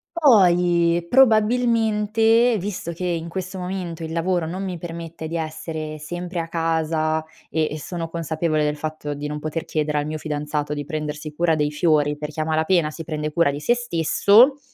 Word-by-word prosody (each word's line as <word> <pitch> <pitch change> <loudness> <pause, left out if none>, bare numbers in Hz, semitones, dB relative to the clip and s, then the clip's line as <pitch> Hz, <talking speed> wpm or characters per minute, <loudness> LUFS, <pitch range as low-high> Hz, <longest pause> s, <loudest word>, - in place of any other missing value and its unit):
Poi 175 - +4
probabilmente, 225 -1 +3
visto 180 -3 -4
che 180 +2 -4
in 170 -1 -2
questo 185 +1 -5
momento 180 -3 -4
il 160 - -5
lavoro 170 0 0
non 180 +4 -4
mi 185 -2 -3
permette 165 -1 -7
di 165 +2 -4
essere 155 -1 -5
sempre 175 +4 -5
a 165 0 -3
casa 160 -1 0 0.2
e 155 -1 -1
sono 165 +1 -5
consapevole 160 -1 -1
del 150 0 0
fatto 155 -1 -4
di 145 +1 -5
non 150 0 -4
poter 155 +2 -3
chiedere 150 -1 -1
al 145 - -1
mio 155 0 -4
fidanzato 150 -1 -3
di 145 -1 -4
prendersi 150 0 -5
cura 165 +1 +1
dei 150 -1 +1
fiori, 150 -1 +2
perché 150 +1 -4
a - - 0
malapena 160 +1 +2
si 165 +2 -8
prende 150 -1 -3
cura 170 -2 +3
di 140 - -4
se 235 +11 +2
stesso 240 - +4
165 Hz, 175 wpm, -22 LUFS, 155-180 Hz, 0.2 s, Poi